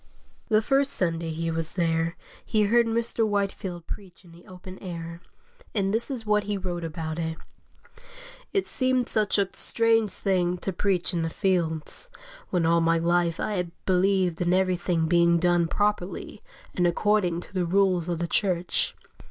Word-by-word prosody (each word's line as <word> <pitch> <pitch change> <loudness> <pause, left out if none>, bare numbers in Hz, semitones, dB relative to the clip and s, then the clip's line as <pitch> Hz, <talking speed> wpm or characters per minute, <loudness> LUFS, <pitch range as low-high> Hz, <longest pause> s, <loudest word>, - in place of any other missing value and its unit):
The 215 0 +3
first 275 +3 +2
Sunday 165 -2 0
he 165 +1 -2
was 165 0 -3
there 165 -1 0 0.3
he 215 -2 +1
heard 235 +3 +3
Mr. 230 0 +2
Whitefield 195 -4 -2
preach 185 -2 -9
in 170 - -16
the 170 +1 -17
open 185 0 -11
air, 170 -2 -7 0.5
and 195 -1 +1
this 230 +5 0
is 250 -5 -5
what 210 -1 +2
he 205 0 -2
wrote 180 -2 -4
about 160 0 -4
it: 160 -1 -3 1.1
"It 395 -2 0
seemed 255 -2 +1
such 215 -2 +1
a 200 -1 +2
strange 225 -2 +2
thing 180 -3 0
to 190 +2 -4
preach 180 0 0
in 170 - 0
the 165 - -1
fields, 170 - -2 0.4
when 175 -3 +1
all 170 +1 +3
my 165 0 +3
life 170 0 +1
I 215 - -1
had 180 -1 -2 0.2
believed 185 -2 +2
in 175 0 +2
everything 180 -3 +1
being 170 0 +4
done 175 0 +2
properly 205 0 -2 0.3
and 175 -1 +2
according 180 -1 +1
to - - -14
the 185 -2 0
rules 185 -2 +2
of 170 - -1
the 170 +1 -2
Church. 180 -2 0
180 Hz, 170 wpm, -26 LUFS, 170-205 Hz, 1.1 s, being